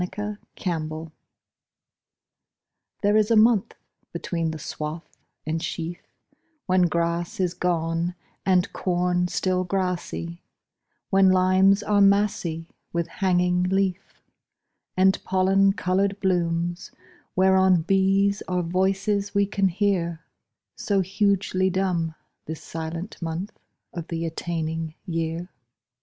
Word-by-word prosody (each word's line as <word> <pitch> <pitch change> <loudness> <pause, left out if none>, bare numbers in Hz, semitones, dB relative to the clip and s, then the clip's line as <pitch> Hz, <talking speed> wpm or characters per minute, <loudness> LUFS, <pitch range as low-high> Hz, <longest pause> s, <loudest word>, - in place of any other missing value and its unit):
Michael 210 +3 -4 0.2
Field 165 -4 -2
July 160 0 -7 1.9
THERE 205 +1 +4
is 215 0 +3
a 230 - +4
month 220 -1 +4 0.4
between 170 -1 -2
the 160 - -4
swath 155 +2 -5 0.4
and 160 +1 -2
sheaf 170 +1 -4 0.7
When 185 -1 +3
grass 170 +1 -1
is 180 -2 +1
gone 170 0 -1 0.3
And 185 -2 +2
corn 180 0 0
still 185 0 0
grassy; 180 -2 -3 0.7
When 195 -1 +5
limes 185 +2 +4
are 205 -1 +2
massy 200 -5 +2 0.2
With 170 0 -1
hanging 180 0 +1
leaf, 190 0 -1 0.7
And 190 +1 +3
pollen 195 +1 +3
coloured 195 +2 0
blooms 175 -1 0 0.5
whereon 190 -2 +4
Bees 195 +2 +2
are 180 -1 0
voices 195 +3 0
we 200 0 +4
can 195 -1 +1
hear, 175 -3 -1 0.5
So 200 -2 +1
hugely 190 -1 +1
dumb 180 -4 -1 0.3
This 160 0 -6
silent 165 +4 -6
month 170 +5 -3 0.4
of 170 -1 -6
the 165 0 -3
attaining 160 -1 -3
year. 165 +1 -3
180 Hz, 110 wpm, -25 LUFS, 170-195 Hz, 1.9 s, When